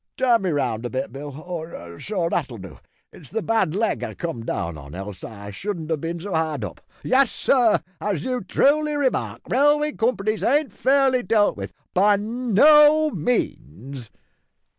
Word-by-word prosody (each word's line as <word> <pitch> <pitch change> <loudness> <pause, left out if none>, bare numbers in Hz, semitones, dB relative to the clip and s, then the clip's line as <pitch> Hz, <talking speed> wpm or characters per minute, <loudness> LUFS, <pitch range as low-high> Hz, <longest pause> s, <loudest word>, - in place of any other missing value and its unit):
Turn 245 -4 +3
me 190 - -1
round 125 -7 -1
a 120 - -3
bit, 130 +2 -3
Bill; 145 +2 -7
so, 165 - -5
that'll 140 -8 -2
do. 95 -9 -11 0.3
It's 145 -7 -14
the 225 - -3
bad 220 -7 +1
leg 220 +2 0
I - - -5
come 165 -10 -5
down 85 -6 -3
on, 70 +1 -10
else 95 0 -7
I 100 -2 -8
shouldn't 165 - -5
have 155 -3 -1
bin 170 +1 -3
so 195 +2 -6
hard 155 -7 -1
up. - - -9 0.2
Yes, 265 -1 +3
sir, 245 -5 +3 0.2
as 195 -7 -2
you 250 -4 -2
truly 300 +9 +2
remark, 280 -3 -1
railway 295 +3 +3
companies 220 -4 -1
ain't 295 0 +1
fairly 265 -1 +3
dealt 220 -3 +2
with, - - -6 0.2
by 205 +3 +4
no 290 +8 +5
means." 130 - -3
195 Hz, 160 wpm, -23 LUFS, -, 0.3 s, no